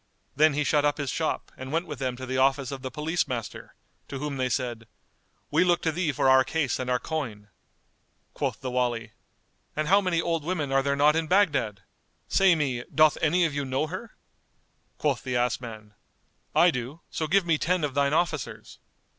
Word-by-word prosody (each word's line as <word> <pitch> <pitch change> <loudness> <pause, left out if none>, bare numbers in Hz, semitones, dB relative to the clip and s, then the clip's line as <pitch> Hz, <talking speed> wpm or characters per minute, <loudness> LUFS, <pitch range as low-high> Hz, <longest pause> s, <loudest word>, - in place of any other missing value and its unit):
Then 155 0 +4
he 150 - +1
shut 145 +1 +2
up 145 0 +1
his 145 -3 -2
shop 160 -1 -2
and 130 +1 -8
went 165 +3 0
with 150 -3 -7
them 130 -2 -2
to 130 +1 -7
the 130 0 -2
office 135 0 +2
of 135 -1 -6
the 130 - -4
Police 155 +6 -1
master 120 -5 -6 0.3
to 140 - -6
whom 145 0 -4
they 130 -1 0
said, 120 -2 -3 0.6
"We 155 +4 +4
look 175 -1 +2
to 160 - +2
thee 165 -1 0
for 135 0 +1
our 130 0 +6
case 150 -2 -1
and 125 -1 -3
our 125 - +3
coin."[FN#203] 120 -8 -5 0.8
Quoth 135 -3 -3
the 130 -1 -4
Wali, 120 -3 -1 0.6
"And 155 0 -1
how 200 +2 +6
many 180 -4 0
old 165 -2 -1
women 155 -4 -2
are 135 0 +3
there 140 +1 0
not 150 +2 +4
in 160 -1 0
Baghdad! 145 - +2 0.4
Say 190 -3 +4
me, 130 -6 -1
doth 155 -1 +5
any 170 +3 +3
of 155 - -1
you 145 0 -1
know 130 +2 -1
her?" 185 +8 -7 0.8
Quoth 140 -5 0
the 125 -2 -3
ass 125 0 +1
man, 110 -3 -9 0.6
"I 175 +1 +6
do; 130 +4 -5
so 160 - -2
give 190 +2 +3
me 165 -3 +2
ten 180 -1 +1
of 145 -3 -1
thine 140 0 +2
officers." 155 -3 -2
145 Hz, 205 wpm, -27 LUFS, 130-160 Hz, 0.8 s, our